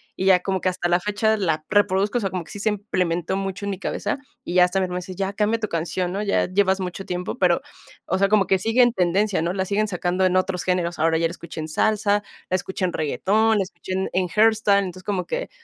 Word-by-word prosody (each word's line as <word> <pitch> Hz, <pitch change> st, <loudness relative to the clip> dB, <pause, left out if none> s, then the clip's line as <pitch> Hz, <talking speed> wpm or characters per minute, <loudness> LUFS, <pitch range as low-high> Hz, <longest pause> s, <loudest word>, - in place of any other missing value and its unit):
y 190 Hz, -, -3 dB
ya 185 Hz, -2 st, +6 dB
como 190 Hz, -1 st, -2 dB
que 185 Hz, -, +2 dB
hasta 180 Hz, -1 st, -2 dB
la 175 Hz, +1 st, +3 dB
fecha 210 Hz, +2 st, +1 dB
la 160 Hz, -5 st, -1 dB
reproduzco, 205 Hz, +3 st, +2 dB
o -, -, -6 dB
sea, 195 Hz, -, -1 dB
como 180 Hz, -2 st, -4 dB
que -, -, -13 dB
sí 205 Hz, -, -7 dB
se 215 Hz, -, +1 dB
implementó 185 Hz, -4 st, -1 dB
mucho 195 Hz, 0 st, -3 dB
en 200 Hz, -, -2 dB
mi 190 Hz, -, -5 dB
cabeza, 205 Hz, +4 st, -2 dB, 0.3 s
y -, -, -4 dB
ya 180 Hz, -, +7 dB
hasta 180 Hz, +2 st, +1 dB
mi 190 Hz, -, +1 dB
hermano 180 Hz, 0 st, -3 dB
dice: 185 Hz, +1 st, -8 dB
"Ya 195 Hz, +1 st, -2 dB
cambia 215 Hz, +3 st, +1 dB
tu 215 Hz, -, -2 dB
canción, 175 Hz, +1 st, -2 dB
¿no? 205 Hz, +2 st, -2 dB
Ya 200 Hz, -, +1 dB
llevas 190 Hz, 0 st, +2 dB
mucho 185 Hz, +1 st, -5 dB
tiempo". 180 Hz, 0 st, -4 dB
Pero, 180 Hz, -2 st, +3 dB, 0.4 s
o 190 Hz, -, 0 dB
sea, 195 Hz, +1 st, +2 dB
como 210 Hz, -2 st, +3 dB
que 190 Hz, -, +3 dB
sigue 225 Hz, +5 st, +2 dB
en 240 Hz, -1 st, +5 dB
tendencia, 190 Hz, 0 st, +1 dB
¿no? 170 Hz, +1 st, 0 dB
La 190 Hz, 0 st, -1 dB
siguen 210 Hz, +3 st, 0 dB
sacando 180 Hz, 0 st, 0 dB
en 185 Hz, 0 st, +3 dB
otros 185 Hz, -1 st, 0 dB
géneros. 175 Hz, -2 st, -1 dB
Ahora 160 Hz, +1 st, +3 dB
ya 165 Hz, 0 st, +2 dB
la -, -, -7 dB
escuché 170 Hz, -1 st, -9 dB
en 155 Hz, -, -5 dB
salsa, 205 Hz, +4 st, +1 dB, 0.3 s
la 185 Hz, -, +1 dB
escuché 190 Hz, +1 st, -2 dB
en 175 Hz, -, -2 dB
reguetón, 210 Hz, -, +1 dB
la 200 Hz, -, +2 dB
escuché 190 Hz, 0 st, -10 dB
en 190 Hz, +1 st, -1 dB
en 185 Hz, 0 st, +1 dB
herstan 210 Hz, -1 st, +3 dB
entonces 185 Hz, +1 st, -9 dB
como 190 Hz, -2 st, -2 dB
que -, -, -3 dB
190 Hz, 260 wpm, -23 LUFS, 180-205 Hz, 0.4 s, ya